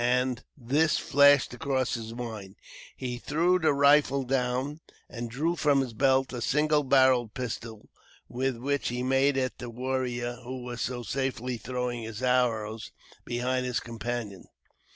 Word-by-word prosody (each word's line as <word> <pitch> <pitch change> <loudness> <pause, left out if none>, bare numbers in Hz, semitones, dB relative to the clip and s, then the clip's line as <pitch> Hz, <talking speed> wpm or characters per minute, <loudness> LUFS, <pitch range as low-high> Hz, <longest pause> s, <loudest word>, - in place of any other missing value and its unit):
As 125 +1 +2 0.2
this 145 +5 +2
flashed 140 -2 +4
across 130 0 -1
his 115 -1 -4
mind, 110 -5 -7 0.4
he 125 -2 -4
threw 170 +7 +2
the 160 -3 +3
rifle 140 -1 +4
down 130 +3 -1 0.3
and 120 -1 -6
drew 155 +8 -1
from 145 -3 +3
his 125 -3 -4
belt 135 +2 +2
a 120 - -4
single 150 +4 +2
barrelled 130 -4 +3
pistol, 115 -3 -6 0.4
with 130 0 -2
which 140 +3 -1
he 125 +1 -2
made 135 +2 +2
at 130 -1 -2
the 120 - -6
warrior 120 0 -2
who 125 0 -6
was 120 -1 -6
so 120 0 -3
safely 130 0 -2
throwing 125 +1 -3
his 110 +2 -7
arrows 115 -4 0 0.4
into 120 +1 -2 0.2
his 125 -2 -1
companion. 115 -4 -5
125 Hz, 150 wpm, -28 LUFS, 120-135 Hz, 0.4 s, flashed